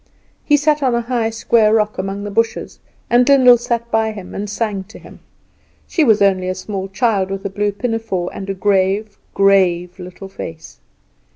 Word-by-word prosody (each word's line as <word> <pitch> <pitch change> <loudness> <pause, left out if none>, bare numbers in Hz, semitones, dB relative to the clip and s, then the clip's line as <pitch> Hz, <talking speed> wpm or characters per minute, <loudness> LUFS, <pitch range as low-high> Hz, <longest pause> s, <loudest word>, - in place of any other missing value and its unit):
He 295 - +3
sat 300 +1 +1
on 255 -3 +1
a 235 - 0
high 235 -1 -1
square 225 -1 +2
rock 210 -2 0
among 195 +1 -4
the 205 - -5
bushes, 230 +2 -2 0.3
and 245 +2 +3
Lyndall 250 -3 +6
sat 235 0 -3
by 220 0 +1
him 195 -3 -10
and 205 +1 -5
sang 205 -2 -2
to 220 - -14
him. - - -15 0.7
She 325 - 0
was 220 -6 +4
only 185 -2 +2
a 185 - -2
small 195 0 -5
child, 195 -2 0
with 195 +1 -5
a 200 - -3
blue 205 +1 -1
pinafore, 225 -4 -3
and 195 0 -7
a 195 - -2
grave, 200 +2 0 0.2
grave, 185 -2 +2
little 180 +2 -9
face. 160 -4 -9
205 Hz, 185 wpm, -18 LUFS, 195-230 Hz, 0.7 s, Lyndall